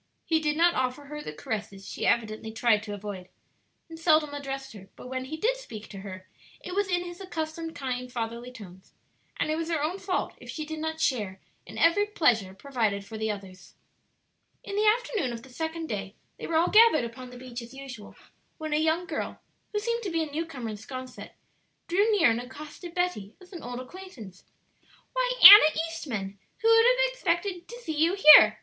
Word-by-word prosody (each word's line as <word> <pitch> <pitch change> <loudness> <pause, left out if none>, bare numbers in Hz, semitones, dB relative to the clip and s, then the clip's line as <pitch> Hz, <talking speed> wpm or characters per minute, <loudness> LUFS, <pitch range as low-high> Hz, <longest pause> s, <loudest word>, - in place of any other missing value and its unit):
He 320 -1 +2
did 300 -1 -1
not 340 +1 +4
offer 255 +2 -2
her 300 +1 -7
the 150 - -6
caresses 195 +3 -6
she - - -3
evidently 220 -1 0
tried 225 -1 +2
to 210 -1 -7
avoid, 200 -3 -8 0.6
and 325 -1 -11
seldom 310 -3 +3
addressed 270 -2 -6
her; 195 -2 -13
but 250 - -11
when 260 0 -4
he 310 +4 -6
did - - 0
speak 220 - -10
to 195 - -9
her 185 -1 -9 0.3
it 360 - -8
was 405 +1 0
in 355 -1 0
his 350 +1 -9
accustomed 325 -2 -5
kind, 250 -3 -4
fatherly 235 +1 -5
tones, 190 -6 -13 0.4
and 310 - -1
it 310 - -1
was 330 0 -3
her 320 -3 0
own 350 +6 -2
fault 380 -1 -2
if - - -13
she 310 - -5
did 315 0 -6
not 320 0 -4
share 210 -11 -1 0.3
in - - -10
every 410 +5 +3
pleasure 225 - +1
provided 220 -6 -2
for 220 - -10
the 220 0 -2
others. 195 -3 -8 0.9
In 400 - -6
the 425 +1 +2
afternoon 435 - +1
of 230 - -8
the 265 - -14
second 320 +5 -4
day 200 -3 -5 0.2
they - - -6
were 330 - -2
all 335 +2 +3
gathered 435 - +6
upon 250 +2 -9
the 250 - -11
beach 245 -1 -8
as 235 +1 -11
usual, 265 -5 -10 0.4
when 310 -2 -4
a - - +3
young 320 +3 +1
girl, - - -5 0.3
who 420 - -2
seemed 465 +3 -1
to 410 - -4
be 330 -2 0
a 305 - -7
new 325 +3 -3
comer 250 -8 -6
in 210 - -7
'Sconset, 255 +4 -9 0.5
drew 405 +6 +2
near 385 - +4
and 230 +1 -1
accosted 300 +7 -10
Betty 355 - -2
as 370 +1 -17
an 340 - -8
old 245 0 -6
acquaintance. 255 - -11 0.7
"Why, - - +1
Anna 395 -7 +11
Eastman, 215 - -5 0.2
who 450 - +4
would 455 0 +6
have - - +3
expected 355 -4 -2
to 475 +1 -10
see 320 - -4
you 330 +5 +2
here?" 305 -6 +9
300 Hz, 205 wpm, -27 LUFS, 230-345 Hz, 0.9 s, Anna